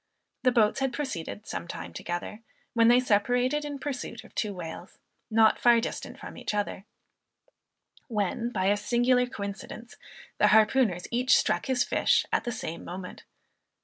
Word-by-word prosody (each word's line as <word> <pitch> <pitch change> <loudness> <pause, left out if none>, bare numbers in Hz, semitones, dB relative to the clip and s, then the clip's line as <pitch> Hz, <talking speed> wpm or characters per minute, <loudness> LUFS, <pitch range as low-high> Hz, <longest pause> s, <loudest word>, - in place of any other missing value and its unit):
The 255 - +4
boats 220 -2 +3
had 270 -2 0
proceeded 215 - -5
some - - -5
time - - -7
together, 175 +5 -5 0.3
when 230 -1 +4
they 240 +1 +6
separated 250 +5 +1
in 290 -1 -5
pursuit 265 -4 -5
of - - -17
two 210 - -1
whales, 175 -4 -8 0.3
not 220 -1 +4
far 240 -1 +5
distant 230 - -5
from - - -9
each - - -3
other; 205 -1 -3 1.2
when, 225 0 -1
by 190 -6 -2
a 205 +1 +3
singular 245 +3 +2
coincidence, 210 +2 -7 0.4
the - - +5
harpooners 215 -4 +3
each 250 +2 +4
struck - - 0
his 255 -2 +2
fish - - +2
at - - +1
the 240 - -1
same 170 -7 -5
moment. 180 +1 -8
230 Hz, 155 wpm, -28 LUFS, 205-250 Hz, 1.2 s, they